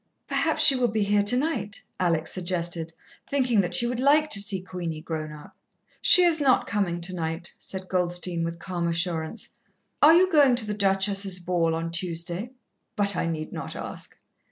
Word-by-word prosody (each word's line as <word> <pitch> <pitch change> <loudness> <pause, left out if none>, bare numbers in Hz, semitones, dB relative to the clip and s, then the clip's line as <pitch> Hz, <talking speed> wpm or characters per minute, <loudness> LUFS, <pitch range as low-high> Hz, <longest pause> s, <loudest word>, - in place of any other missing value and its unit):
"Perhaps - - +2
she 275 - +9
will 250 -1 +1
be 215 -1 -1
here 205 0 +2
tonight," 235 -1 0 0.2
Alex 165 -3 0
suggested, 175 -2 -3 0.4
thinking 255 -6 +1
that 175 -1 -2
she 240 - +5
would 245 0 -3
like 300 +3 +3
to 200 - +5
see 200 -1 +2
Queenie 180 -3 -6
grown 155 -1 -5
up. 150 -1 -13 0.5
"She 360 - +7
is 335 -2 +3
not 265 -3 +3
coming 180 -4 -2
tonight," 170 -1 -5
said 190 -1 -6
Goldstein 175 -1 -1
with 170 0 -4
calm 175 0 -4
assurance. 170 +3 -3 0.5
"Are 310 +3 +7
you 370 +2 +4
going 285 -6 +5
to 235 -2 0
the 210 - -3
Duchess's 195 -1 +1
ball 175 -2 -1
on 165 0 -4
Tuesday? 175 +4 -4 0.5
But 200 -2 0
I - - -1
need 155 -2 -4
not - - -7
ask." - - -8
185 Hz, 175 wpm, -25 LUFS, 170-225 Hz, 0.5 s, she